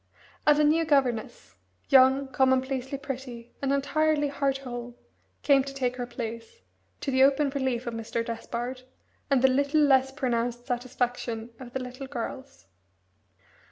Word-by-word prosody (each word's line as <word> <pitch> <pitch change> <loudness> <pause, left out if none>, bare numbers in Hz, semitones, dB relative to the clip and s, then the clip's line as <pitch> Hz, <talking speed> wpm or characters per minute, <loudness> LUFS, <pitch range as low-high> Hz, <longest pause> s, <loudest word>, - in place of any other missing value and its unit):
And 295 -1 +6
a 300 - +4
new 310 +2 +4
governess, 275 - 0 0.4
young, 270 0 +5
commonplacely 265 +1 +1
pretty, 255 -4 -7
and 275 -1 0
entirely 290 +2 +1
heart 275 -1 0
whole, 245 -1 -7 0.5
came 275 -2 +5
to 275 0 -8
take 250 -2 -1
her 245 -1 -4
place, 235 - -7 0.4
to 275 - -2
the 260 0 +3
open 275 +1 +4
relief 260 -3 -1
of 235 - -4
Mr. 230 +1 -3
Despard, 240 +2 -5 0.5
and 270 -3 +3
the - - +8
little 280 +3 +2
less 265 -2 +4
pronounced 240 -3 -2
satisfaction 245 -2 -3
of 250 -2 -10
the 265 - -3
little 255 +2 -8
girls. 260 - -7
260 Hz, 145 wpm, -27 LUFS, 245-275 Hz, 0.5 s, the